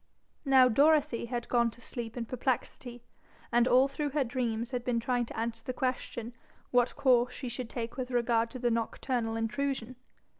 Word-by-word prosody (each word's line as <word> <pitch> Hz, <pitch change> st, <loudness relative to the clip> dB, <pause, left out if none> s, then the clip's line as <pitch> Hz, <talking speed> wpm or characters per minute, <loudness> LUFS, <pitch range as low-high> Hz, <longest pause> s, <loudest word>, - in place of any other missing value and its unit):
Now 265 Hz, -2 st, +6 dB
Dorothy 285 Hz, 0 st, +3 dB
had 240 Hz, -1 st, -3 dB
gone 235 Hz, -1 st, +3 dB
to 230 Hz, -, -14 dB
sleep 235 Hz, -1 st, -6 dB
in 235 Hz, -, -2 dB
perplexity, 245 Hz, 0 st, -3 dB, 0.5 s
and 240 Hz, +1 st, +4 dB
all 255 Hz, +2 st, +5 dB
through 290 Hz, +1 st, -3 dB
her 285 Hz, -, +4 dB
dreams 235 Hz, -1 st, -2 dB
had 250 Hz, -2 st, -2 dB
been 240 Hz, -1 st, 0 dB
trying 240 Hz, 0 st, 0 dB
to -, -, -9 dB
answer 225 Hz, 0 st, -3 dB
the 255 Hz, -, -4 dB
question 250 Hz, -3 st, -3 dB, 0.4 s
what 245 Hz, -1 st, +2 dB
course 250 Hz, -2 st, +3 dB
she 260 Hz, -, -6 dB
should 240 Hz, 0 st, -4 dB
take 235 Hz, 0 st, -5 dB
with 255 Hz, -1 st, -3 dB
regard 235 Hz, -2 st, +1 dB
to 255 Hz, -, -7 dB
the 240 Hz, -1 st, 0 dB
nocturnal 230 Hz, 0 st, -1 dB
intrusion. 255 Hz, +2 st, -2 dB
245 Hz, 180 wpm, -30 LUFS, 230-255 Hz, 0.5 s, Now